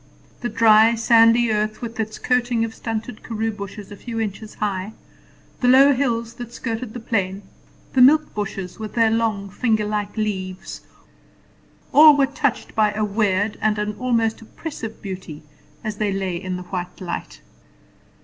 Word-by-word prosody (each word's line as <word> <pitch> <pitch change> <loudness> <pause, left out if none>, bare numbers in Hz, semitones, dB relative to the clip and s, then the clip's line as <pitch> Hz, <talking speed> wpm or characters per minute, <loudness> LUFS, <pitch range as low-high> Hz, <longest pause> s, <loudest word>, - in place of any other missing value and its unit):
The 240 - -3
dry, 220 +1 +5
sandy 230 0 +5
earth, 215 0 -1
with 230 0 -6
its 220 0 -3
coating 245 -2 +1
of 225 - -7
stunted 225 0 -5
karoo 225 -1 -2
bushes 205 0 -8
a - - -7
few 230 +2 -6
inches 215 0 -5
high, 200 0 -3 0.7
the 250 - +1
low 270 +3 +7
hills 235 -3 -1
that 240 -1 -8
skirted 230 -1 -5
the - - -4
plain, 200 -4 -2 0.5
the 260 - +4
milk 305 +4 +5
bushes 195 -3 -5
with 215 -1 -7
their 225 -2 +4
long 220 -3 0
finger 220 -1 +1
like 210 0 -3
leaves, 190 -4 -4 1.1
all 300 -1 +9
were 275 - +4
touched 280 -1 -2
by 215 -1 +3
a 215 +1 0
weird 205 0 0
and 215 -1 +1
an 210 0 -2
almost 230 -3 0
oppressive 225 -2 -8
beauty 185 -6 -7 0.4
as 215 -2 -4
they 210 -1 0
lay 190 -2 -2
in 185 +1 -4
the 180 - -7
white 180 -1 -6
light. 170 - -6
220 Hz, 160 wpm, -22 LUFS, 205-235 Hz, 1.1 s, all